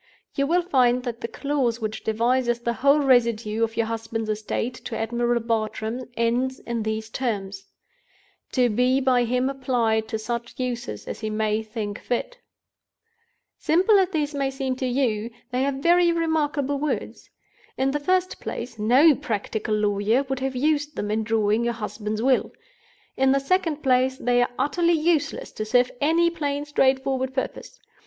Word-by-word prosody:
You 280 0 0
will 350 +3 +2
find 250 -7 +2
that 240 -2 -5
the - - -2
clause 255 -2 -1
which 215 -1 -4
devises 240 +2 +1
the 235 0 -1
whole 280 +4 +3
residue 235 -4 +2
of 225 0 -2
your 230 - +2
husband's 225 -1 -3
estate 215 +3 -2
to 225 - -4
Admiral 240 +1 0
Bartram 225 +2 -2
ends 245 +3 0
in 235 -1 -3
these 220 0 -3
terms: 205 -5 -3 0.9
to 250 -2 +3
be 250 +4 +2
by 255 -2 +3
him 250 +2 +1
applied 245 -5 0
to 220 - -2
such 235 +3 -5
uses 245 -1 -4
as - - -5
he 215 - -3
may 215 0 0
think 215 -2 -5
fit. - - -3 1.2
"Simple 380 +6 +4
as 375 -2 +2
they 315 -5 0
may 275 -1 0
seem 265 -1 -3
to 260 - -1
you, 240 -4 0 0.2
these 255 +2 +1
are - - +1
very 340 +5 +3
remarkable 305 -4 0
words. 300 0 -3 0.5
In 265 +1 +1
the 295 - -1
first 370 +4 0
place, 235 -3 -6
no 260 +9 +6
practical 220 -5 -2
lawyer 210 +4 +1
would 270 -1 -3
have 265 0 -2
used 295 +2 0
them 205 0 -3
in 220 +1 0
drawing 220 0 +1
your 235 0 0
husband's 215 0 -4
will. 260 -1 +2 0.7
In 265 0 +4
the 275 - +3
second 320 0 0
place, 260 0 +2
they 245 -1 +2
are 245 - +1
utterly 335 +6 +2
useless 315 -2 0
to 215 - -4
serve 245 +3 +2
any 335 +3 +3
plain 290 -3 -2
straightforward 265 -2 +1
purpose. 260 - -4
250 Hz, 165 wpm, -24 LUFS, 225-280 Hz, 1.2 s, no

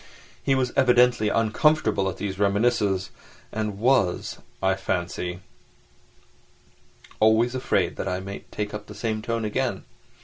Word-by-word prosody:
He 135 - +2
was 130 -2 0
evidently 125 -4 +4
uncomfortable 110 -2 +2
at 95 - -6
these 95 -1 -4
reminiscences, 100 -2 +1 0.4
and 105 -2 -3
was, 110 -6 +1 0.2
I 95 0 +2
fancy, 90 -1 -3 1.8
always 110 +3 +4
afraid 130 - 0
that - - -3
I 90 -1 -1
might 100 +1 -8
take 105 0 -4
up 105 0 -6
the 105 - -10
same 110 0 -2
tone 115 0 -2
again. 105 - -1
105 Hz, 130 wpm, -25 LUFS, 95-120 Hz, 1.8 s, evidently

